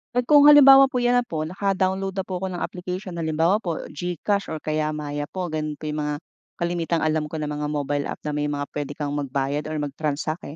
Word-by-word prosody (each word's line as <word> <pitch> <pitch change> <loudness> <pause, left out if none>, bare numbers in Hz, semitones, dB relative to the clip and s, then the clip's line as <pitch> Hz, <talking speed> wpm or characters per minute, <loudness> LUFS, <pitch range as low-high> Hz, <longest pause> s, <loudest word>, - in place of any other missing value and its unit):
At 245 - +2
kung 290 +2 +6
halimbawa 275 -2 +9
po 265 - -11
'yan 245 0 +4
na 240 - -4
po, 155 -1 -3
naka-download 190 +2 -1
na 190 - -1
po 185 -1 -5
ako 190 - -3
ng 180 -1 -4
application, 180 0 -5
halimbawa 165 +5 +2
po 170 -6 -4
GCash 180 +5 -2
or 160 -1 -6
kaya 155 0 0
Maya 145 -1 -4
po, 180 -1 -5
gano'n 155 -1 -3
po 155 0 -5
yung 150 - -3
mga 150 0 -1 0.4
kalimitang 170 -1 -1
alam 155 -1 0
ko 150 - -8
na 150 -1 -3
mga 150 0 -3
mobile 145 -1 -2
app - - -7
na 150 - -2
may 150 0 -1
mga 145 -1 -2
pwede 145 -1 -4
kang 145 -1 -3
magbayad 145 +1 -2
or 155 - -4
mag-transact, 150 +1 -3
155 Hz, 220 wpm, -24 LUFS, 150-185 Hz, 0.4 s, halimbawa